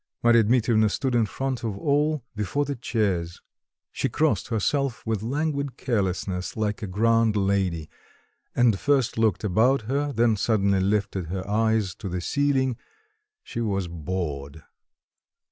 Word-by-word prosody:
Marya 120 -1 +6
Dmitrievna 110 -2 +3
stood 130 +3 -1
in 115 -3 +3
front 130 +1 -3
of 110 -4 -3
all, 145 +3 +1
before 105 +8 -1
the 140 0 -3
chairs; 100 -8 -1 0.5
she - - -1
crossed - - +1
herself 125 +3 -1
with 110 -3 -1
languid 140 +2 -2
carelessness, 95 -6 -2
like 105 0 -1
a 105 - -3
grand 115 +3 +2
lady, 95 -5 0 0.7
and 120 -5 +3
first 140 -4 +1
looked 110 -4 +2
about 115 +7 +3
her, 140 +5 -1
then 115 -3 +2
suddenly 100 -2 +2
lifted 100 -2 0
her 95 +2 -4
eyes 110 -2 +1
to 95 - -7
the 90 0 -2
ceiling; 130 +3 +1 0.7
she 115 - -5
was 100 -5 -1
bored. 80 -4 -5
110 Hz, 140 wpm, -25 LUFS, 95-125 Hz, 0.7 s, Marya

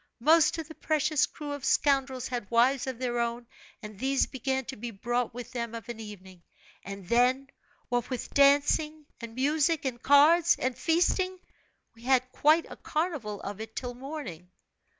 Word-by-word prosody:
Most 320 +6 +4
of 325 -2 -5
the 320 - -10
precious 305 -2 +1
crew 295 -1 -8
of 285 -2 -6
scoundrels 270 -3 +1
had 240 -5 -4
wives 245 +3 +3
of 260 -2 -4
their 240 -1 -2
own 235 0 -2 0.4
and 210 -2 -9
these 270 +2 +1
began 265 0 -3
to 265 - -6
be 235 +3 -6
brought 240 +3 -2
with 245 +1 -8
them 235 -2 -4
of 230 0 -9
an 235 -2 -6
evening; 190 -4 -11 0.4
and 195 -2 -8
then, 255 +4 +2 0.4
what 245 -1 -1
with 255 -2 -5
dancing, 290 +2 +3
and 230 -1 -9
music, 295 +3 +1
and 240 -3 -3
cards, 320 +5 +5
and 255 -1 -2
feasting, 365 +4 +1 0.6
we 230 - -19
had 255 0 +1
quite 310 +5 +3
a - - -10
carnival 295 - -3
of 205 +1 -6
it 220 0 -9
till 245 -2 -4
morning. 245 - -8
260 Hz, 170 wpm, -28 LUFS, 235-290 Hz, 0.6 s, cards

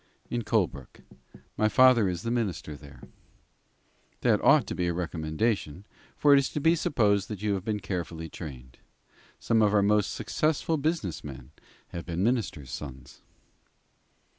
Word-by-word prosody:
"In 120 - -1
Colebrook. 90 - -2 0.6
My 110 - +3
father 125 -5 +5
is 90 0 -4
the 115 - -2
minister 100 -10 -2
there." 70 -1 -14 1.2
"That - - +2
ought - - +6
to - - -5
be 90 - -1
a 85 - 0
recommendation, 85 +2 -2 0.3
for 145 -1 +5
it 140 - +7
is 140 - -1
to - - -1
be 165 +3 +4
supposed 105 - +1
you 105 0 0
have 95 -2 -3
been 105 0 -2
carefully 85 -3 -4
trained. 65 -6 -10 0.6
Some 115 -1 +2
of 105 -1 +3
our 100 - +4
most 105 0 +2
successful 155 +1 0
business 150 - -2
men 65 -2 -9 0.4
have 85 -1 -7
been 85 +1 -2
ministers' 100 - -1
sons." 65 -1 -9
100 Hz, 150 wpm, -28 LUFS, 80-115 Hz, 1.2 s, it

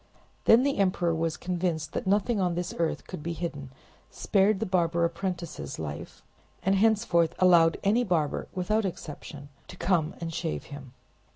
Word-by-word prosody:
Then 230 +3 +7
the 280 -4 0
emperor 185 -3 +2
was 165 0 -1
convinced 175 -4 -2
that - - -3
nothing 205 +2 +2
on 180 -2 +1
this 175 0 -3
earth 165 -1 -1
could - - -7
be 170 +2 -3
hidden, 150 -5 -5 0.4
spared 200 0 +2
the 225 - -1
barber 170 -3 +1
apprentices 170 -5 -4
life, 75 -2 -7 0.4
and 190 +2 +2
henceforth 200 -5 +2
allowed 170 -3 +5
any 220 +5 +3
barber, 165 -9 0
without 210 +4 +1
exception, 150 -5 -7 0.2
to 180 - -11
come 170 -4 +1
and 165 -1 -5
shave 75 - -3
him. 135 -3 -10
175 Hz, 160 wpm, -28 LUFS, 160-195 Hz, 0.4 s, Then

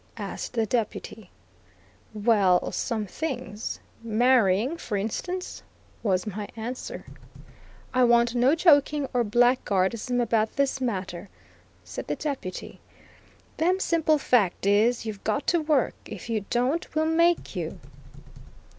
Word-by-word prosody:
asked - - -5
the 225 -2 +1
Deputy. 220 -2 -3 0.8
"Well, 205 -4 +2
some 220 -3 -2
things, 240 -4 -5 0.2
marrying 230 - +3
for 210 -10 -3
instance," 355 - -4 0.4
was 190 -3 +1
my 210 0 -5
answer. 250 - -6 0.9
"I 255 0 +4
want 235 0 +4
no 250 +5 +4
joking 295 -4 +4
or 245 -1 +2
blackguardism 235 0 +1
about 225 -2 +1
this 275 -1 0
matter," 190 -5 -3 0.5
said - - -7
the - - -1
Deputy; 270 -12 -5 0.8
"them 360 +3 +2
simple 320 -4 +2
fact 220 -10 +1
is, 220 +4 +3
you've 215 -3 -6
got 285 - -1
to 345 -2 +2
work; 300 -5 +1
if 230 - -7
you 215 -3 -1
don't 265 +8 -1
we'll 315 0 +2
make 335 +2 +2
you." - - -4
240 Hz, 120 wpm, -26 LUFS, 210-285 Hz, 0.9 s, I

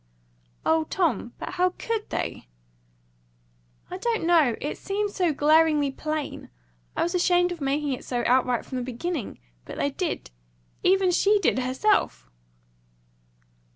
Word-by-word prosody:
"O 320 0 +3
Tom! 300 - -1
But - - -6
how 365 0 0
COULD 455 -2 -3
they?" - - -4 1.4
"I 365 - -5
don't 460 -1 -1
know. 320 -9 +4
It 295 - -4
seemed 410 +1 -2
so 360 -5 +1
glaringly 300 -1 +3
plain 305 +1 -4 0.5
I - - +1
was 345 - -1
ashamed 355 0 +3
of 345 -3 -6
making 280 +1 0
it 255 - -6
so 245 -2 -2
outright 250 -1 +2
from 260 - -5
the 250 - -2
beginning. 260 - -4 0.3
But - - -9
they 285 - 0
did. 330 - -3 0.5
Even 375 0 +3
she 405 +4 +4
did, 370 -9 +1
herself!" 260 - +1
320 Hz, 140 wpm, -25 LUFS, 270-365 Hz, 1.4 s, know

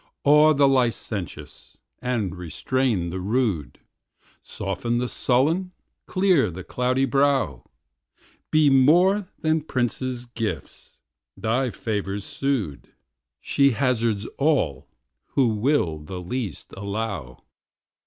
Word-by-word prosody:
Awe 150 +2 +6
the 140 0 +5
licentious, 120 -7 -2 0.2
and 115 -8 -1
restrain 90 +2 -1
the 95 - -4
rude; 100 - -1 0.6
Soften 100 +4 -3
the 125 +1 0
sullen, 160 +11 +1 0.3
clear 185 - +3
the 90 +2 -8
cloudy 125 +5 0
brow: 140 -1 +1 0.9
Be, 155 -1 +4
more 175 +9 +4
than 155 -1 +1
princes' 125 -2 -2
gifts, 110 - -6 0.4
thy 125 +4 0
favours 100 -2 -3
sued; 120 - -3 0.5
She 140 -2 +3
hazards 115 -5 0
all, 140 - +1 0.5
who 130 -4 +4
will 105 - +1
the 85 +5 -7
least 100 - -5
allow. 100 - -4
120 Hz, 100 wpm, -24 LUFS, 100-140 Hz, 0.9 s, Awe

